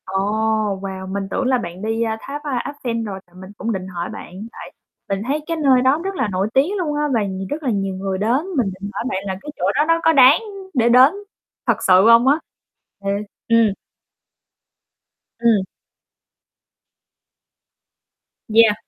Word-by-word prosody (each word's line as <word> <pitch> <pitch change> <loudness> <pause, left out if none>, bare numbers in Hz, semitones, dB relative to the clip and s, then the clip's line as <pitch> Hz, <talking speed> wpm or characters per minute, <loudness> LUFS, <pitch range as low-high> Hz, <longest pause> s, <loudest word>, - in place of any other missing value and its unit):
Ồ, 190 - -9 0.7
wow, 190 -1 -6
mình 200 0 -2
tưởng - - -1
là 255 0 +3
bạn 180 -5 -7
đi, 225 +2 -1
a, 220 -1 -2
tháp, 290 +2 -6
a, 275 -5 -1 0.2
Eiffel 230 -2 -2
rồi 195 -2 -5
thì 175 - -28
mình 190 +1 -10
cũng 230 - -2
định 185 -1 -5
hỏi 175 -2 -5
bạn, - - -9 0.2
tại - - -10 0.4
mình 195 0 -1
thấy 295 +3 -1
cái 330 - -2
nơi 270 -5 +4
đó 265 +4 +3
rất 390 0 -3
là 260 - 0
nổi 190 +2 0
tiếng 315 +10 +2
luôn 315 -6 -2
á 295 0 +1
và 225 -3 +2
nh 190 -1 -4
rất 310 +2 -4
là 265 - 0
nhiều 195 -3 -1
người 190 0 -3
đến, 235 - +1
mình 220 -7 +1
định 200 +1 -6
hỏi - - -3
bạn 190 -6 -3
là 190 -1 -3
cái 295 - -9
chỗ - - -1
đó 295 - +3
nó 330 0 +3
có 325 - +5
đáng 270 +1 +7 0.3
để 240 -4 +3
đến 255 +5 +7 0.5
thật - - +1
sự 185 +2 +6
hông 230 +2 +6
á? 290 +4 +4 0.7
Thiệt, 200 +1 -1 0.2
ừm. 230 -3 +4 1.7
Ừm. 230 -4 +3 2.9
Yeah. 220 -1 +6
230 Hz, 185 wpm, -20 LUFS, 195-270 Hz, 2.9 s, đáng